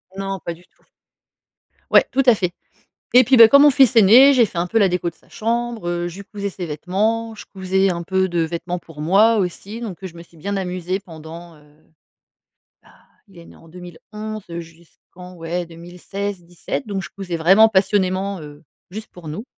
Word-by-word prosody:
Non, 195 Hz, -1 st, -4 dB
pas 170 Hz, -, -4 dB
du 175 Hz, +2 st, -18 dB
tout. -, -, -36 dB, 1.1 s
Ouais, -, -, +6 dB
tout 270 Hz, +1 st, +2 dB
à 245 Hz, -, +7 dB
fait 180 Hz, -3 st, -2 dB, 0.6 s
et 250 Hz, 0 st, +8 dB
puis, 255 Hz, 0 st, +4 dB
bah, 225 Hz, -1 st, +10 dB
quand 280 Hz, -, +7 dB
mon 290 Hz, 0 st, +7 dB
fils 265 Hz, -3 st, +4 dB
est 220 Hz, -, +8 dB
né, 260 Hz, +8 st, +7 dB
j'ai 240 Hz, -2 st, +5 dB
fait 180 Hz, -4 st, -6 dB
un 175 Hz, -, 0 dB
peu 225 Hz, -, -6 dB
la 200 Hz, -3 st, +4 dB
déco 180 Hz, -1 st, -1 dB
de 165 Hz, -, -8 dB
sa -, -, -28 dB
chambre, 230 Hz, -3 st, -3 dB
heu, 175 Hz, 0 st, -2 dB
je 175 Hz, +3 st, -11 dB
lui -, -, -10 dB
cousais 200 Hz, -2 st, -5 dB
ses 180 Hz, -2 st, -7 dB
vêtements, 215 Hz, +9 st, -2 dB
je -, -, -12 dB
cousais 190 Hz, 0 st, 0 dB
un 170 Hz, -1 st, -2 dB
peu 190 Hz, +1 st, 0 dB
de 170 Hz, -1 st, -1 dB
vêtements 170 Hz, +2 st, -3 dB
pour 165 Hz, -3 st, -13 dB
moi 205 Hz, +8 st, +4 dB
aussi 200 Hz, +4 st, -4 dB
donc, 195 Hz, -5 st, -7 dB
heu, -, -, -5 dB
je 170 Hz, -, -11 dB
me 170 Hz, -, -11 dB
suis 170 Hz, 0 st, -21 dB
bien 200 Hz, +6 st, -4 dB
amusée 185 Hz, +1 st, -3 dB
pendant, 165 Hz, 0 st, -12 dB
heu 150 Hz, -, -21 dB, 1.2 s
bah, -, -, -22 dB, 0.4 s
il 190 Hz, -3 st, -19 dB
est 170 Hz, -, -13 dB
né -, -, -16 dB
en 165 Hz, -, -19 dB
2011 200 Hz, +5 st, -9 dB
heu, 170 Hz, 0 st, -5 dB
jusqu'en 170 Hz, +2 st, -16 dB
ouais 170 Hz, +1 st, -4 dB
2016-17 175 Hz, +4 st, -7 dB
donc 195 Hz, -2 st, -4 dB
je -, -, -8 dB
cousais 180 Hz, -4 st, -5 dB
vraiment 195 Hz, +7 st, +5 dB
passionnément 190 Hz, -2 st, 0 dB
heu, 150 Hz, +1 st, -12 dB, 0.3 s
juste 215 Hz, +2 st, -9 dB
pour 175 Hz, -3 st, -12 dB
nous. 180 Hz, +11 st, -6 dB
185 Hz, 210 wpm, -20 LUFS, 170-210 Hz, 1.2 s, bah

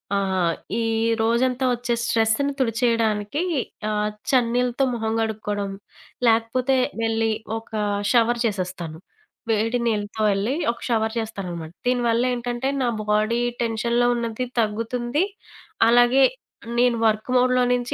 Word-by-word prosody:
ఆహ్, 190 Hz, -4 st, +1 dB, 0.2 s
ఈ -, -, 0 dB, 0.4 s
రోజంతా 250 Hz, +3 st, +1 dB
ఒచ్చే 240 Hz, 0 st, -2 dB
స్ట్రెస్‌ని 230 Hz, +5 st, +1 dB
తుడిచేయడానికి 230 Hz, 0 st, +1 dB, 0.5 s
ఆహ్, 210 Hz, 0 st, 0 dB, 0.2 s
చన్నీల్లతో 245 Hz, 0 st, +2 dB
మొహం 225 Hz, -2 st, -2 dB
కడుక్కోవడం, 210 Hz, -2 st, -2 dB, 0.6 s
లేకపోతే 230 Hz, +4 st, +2 dB, 0.3 s
వెళ్ళి 225 Hz, 0 st, +1 dB, 0.3 s
ఒక 225 Hz, +1 st, -11 dB, 0.4 s
షవర్ 240 Hz, 0 st, +3 dB
చేసేస్తాను. 180 Hz, -6 st, -3 dB, 0.5 s
వేడి 225 Hz, +3 st, +1 dB
నీళ్లతో, 210 Hz, -1 st, -2 dB
వెళ్ళి 200 Hz, +6 st, 0 dB, 0.2 s
ఒక 235 Hz, -, -11 dB
షవర్ 220 Hz, -1 st, +1 dB
చేస్తాననమాట. 180 Hz, -7 st, -5 dB, 0.2 s
దీనివల్ల 240 Hz, -1 st, +2 dB
ఏంటంటే, 245 Hz, +2 st, -2 dB
నా 250 Hz, -, +2 dB, 0.2 s
బాడీ 215 Hz, +3 st, +2 dB, 0.2 s
టెన్షన్‌లో 235 Hz, +1 st, +1 dB
ఉన్నది 235 Hz, +1 st, -2 dB
తగ్గుతుంది. 240 Hz, -, 0 dB, 0.6 s
అలాగే 245 Hz, +3 st, +5 dB, 0.6 s
నేను 245 Hz, -1 st, +3 dB
వర్క్ 215 Hz, +2 st, -1 dB
మోడ్‌లో 250 Hz, 0 st, +3 dB
నుంచి 245 Hz, 0 st, -1 dB
230 Hz, 110 wpm, -23 LUFS, 215-245 Hz, 0.6 s, అలాగే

